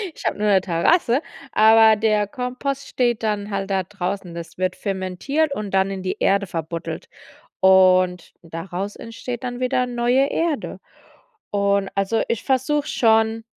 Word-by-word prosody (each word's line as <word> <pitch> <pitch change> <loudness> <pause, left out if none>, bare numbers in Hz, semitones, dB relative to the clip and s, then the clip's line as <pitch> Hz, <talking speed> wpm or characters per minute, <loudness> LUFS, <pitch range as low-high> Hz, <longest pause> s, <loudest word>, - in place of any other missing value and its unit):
Ich - - -11
habe - - 0
nur 210 - 0
'ne 195 -2 +4
Terrasse, 235 - +2 0.3
aber 220 0 +6
der 210 -1 +1
Kompost 255 +4 -4
steht 240 -3 0
dann 210 -1 -1
halt 195 0 -3
da 190 -1 +1
draußen. 190 -1 -5
Das 170 -1 -8
wird 185 0 0
fermentiert 200 - -2
und 205 -2 -5
dann 190 0 +2
in 190 -1 -5
die 185 - -3
Erde 200 0 +2
verbuddelt, 165 0 -5 0.5
und 185 -2 +4
daraus 175 +4 -6
entsteht 235 +2 -7
dann 245 0 -4
wieder 255 0 +1
neue 245 +3 +1
Erde. 325 -4 -2 0.7
Und, 200 -1 +1
also, 195 +3 0
ich 230 - -2
versuche 285 +3 0
schon, 225 -1 +2
210 Hz, 150 wpm, -22 LUFS, 190-245 Hz, 0.7 s, aber